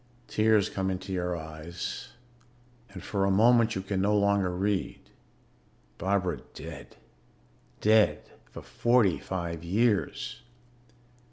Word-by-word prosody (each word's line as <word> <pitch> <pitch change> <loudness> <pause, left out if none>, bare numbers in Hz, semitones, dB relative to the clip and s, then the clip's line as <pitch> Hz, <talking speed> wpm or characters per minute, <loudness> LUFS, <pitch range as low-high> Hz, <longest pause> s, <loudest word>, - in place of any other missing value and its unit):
Tears 110 -2 +3
come 95 -1 -2
into 95 +1 -4
your 90 -1 -1
eyes 80 +1 -7 0.8
and 95 -3 -10
for 100 -2 -1
a 100 - +2
moment 115 +3 +4
you 95 - -3
can 95 -1 -2
no 105 +2 +2
longer 100 -2 +2
read. 95 +2 -1 1.0
Barbara 90 -6 0 0.2
dead - - -9 0.9
dead 110 0 +4 0.3
for - - -10
forty 120 -7 +2
five 85 -3 -4
years. 105 +4 0
95 Hz, 110 wpm, -28 LUFS, 90-105 Hz, 1.0 s, moment